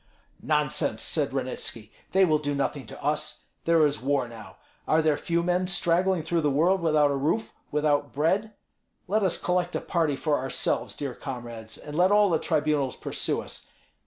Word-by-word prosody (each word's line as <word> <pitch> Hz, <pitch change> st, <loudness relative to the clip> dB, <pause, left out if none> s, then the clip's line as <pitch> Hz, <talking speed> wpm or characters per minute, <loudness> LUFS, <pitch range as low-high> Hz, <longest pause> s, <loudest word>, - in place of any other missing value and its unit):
"Nonsense!" -, -, 0 dB
said -, -, 0 dB
Ranitski. -, -, -3 dB, 0.2 s
"They 190 Hz, 0 st, +5 dB
will 155 Hz, -3 st, +2 dB
do 145 Hz, -1 st, -2 dB
nothing 140 Hz, 0 st, -2 dB
to -, -, -10 dB
us. 150 Hz, +2 st, -2 dB, 0.2 s
There 165 Hz, -2 st, +5 dB
is 145 Hz, 0 st, 0 dB
war 140 Hz, -1 st, +1 dB
now; 115 Hz, -1 st, -12 dB, 0.3 s
are 155 Hz, -, +4 dB
there 155 Hz, -2 st, +3 dB
few 170 Hz, +3 st, -1 dB
men 180 Hz, +1 st, +1 dB
straggling 180 Hz, 0 st, +2 dB
through 165 Hz, +1 st, 0 dB
the 150 Hz, -, +2 dB
world 170 Hz, +7 st, +2 dB
without 155 Hz, -3 st, +3 dB
a -, -, 0 dB
roof, 155 Hz, +11 st, -1 dB, 0.2 s
without 145 Hz, -1 st, +1 dB
bread? 190 Hz, +9 st, +1 dB, 0.6 s
Let 210 Hz, +4 st, +1 dB
us 190 Hz, -4 st, +1 dB
collect 180 Hz, 0 st, 0 dB
a -, -, +1 dB
party 165 Hz, -5 st, 0 dB
for 150 Hz, +1 st, 0 dB
ourselves, 135 Hz, +1 st, -1 dB
dear 140 Hz, -3 st, -4 dB
comrades, 120 Hz, -5 st, -7 dB
and 150 Hz, -, -8 dB
let 180 Hz, +4 st, +4 dB
all 205 Hz, -2 st, +5 dB
the 160 Hz, -, +2 dB
tribunals 150 Hz, -4 st, 0 dB
pursue -, -, -2 dB
us. -, -, -9 dB
155 Hz, 180 wpm, -27 LUFS, 145-175 Hz, 0.6 s, They